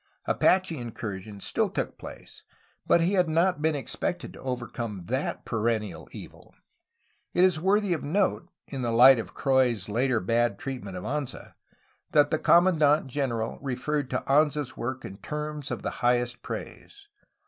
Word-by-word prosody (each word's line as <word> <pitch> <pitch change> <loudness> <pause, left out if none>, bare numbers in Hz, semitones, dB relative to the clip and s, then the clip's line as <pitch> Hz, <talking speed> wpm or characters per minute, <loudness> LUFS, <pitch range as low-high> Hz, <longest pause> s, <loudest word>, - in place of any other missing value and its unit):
Apache 185 -5 +2
incursions 105 -4 -6
still - - +1
took - - -3
place, - - -11 0.5
but 170 - +5
he 175 +4 +1
had 180 -4 +3
not 165 0 +2
been 160 0 +2
expected 175 +5 -3
to - - -12
overcome 120 -6 -4
that 130 +7 -2
perennial 110 -2 -2
evil. - - -12 0.8
It 180 - +5
is 185 -4 +4
worthy 195 +2 +2
of 160 - -3
note 180 +2 0
— - - -28
^in 135 - -3
the 120 - -1
light 125 +2 +7
of 115 - -7
Croix's 130 -7 +2
later 120 +2 +1
bad 115 +2 +1
treatment 120 -9 -6
of 90 - -7
Anza 145 -1 -4 0.3
— - - -39
that 145 -1 +5
the 155 - +1
commandant 160 -5 +4
general 125 -4 -2
referred 140 +1 -2
to 125 - -2
Anza's 145 -1 +2
work 130 +2 -4
in 95 - -8
terms 150 +4 -5
of - - -4
the - - -2
highest 120 0 +1
praise. 405 0 -8
135 Hz, 160 wpm, -27 LUFS, 120-155 Hz, 0.8 s, light